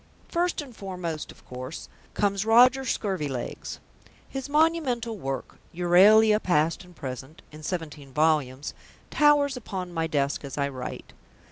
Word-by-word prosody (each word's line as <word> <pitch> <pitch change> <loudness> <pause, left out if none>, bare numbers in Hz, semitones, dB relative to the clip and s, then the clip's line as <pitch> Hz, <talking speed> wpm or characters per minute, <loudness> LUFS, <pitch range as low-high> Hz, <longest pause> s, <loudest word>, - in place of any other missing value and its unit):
First 345 -2 0
and 255 -5 -13
foremost, 180 -6 -5
of - - -19
course, 130 +4 -7 0.3
comes 200 -1 +1
Roger 250 +4 +5
Scurvilegs. 150 - -3 0.5
His 270 +1 -6
monumental 290 -7 +1
work, 135 -8 -5 0.2
Euralia 210 +5 +6
Past 165 0 +1
and 180 -1 -17
Present, 130 +2 -7
in 155 0 -11
seventeen 155 -4 -5
volumes, 150 -2 +1 0.4
towers 290 -2 +4
upon 190 -7 -5
my 165 -1 0
desk 140 -3 0
as 140 -1 -7
I 140 -1 0
write. 130 -2 -7
180 Hz, 130 wpm, -26 LUFS, 150-235 Hz, 0.5 s, Euralia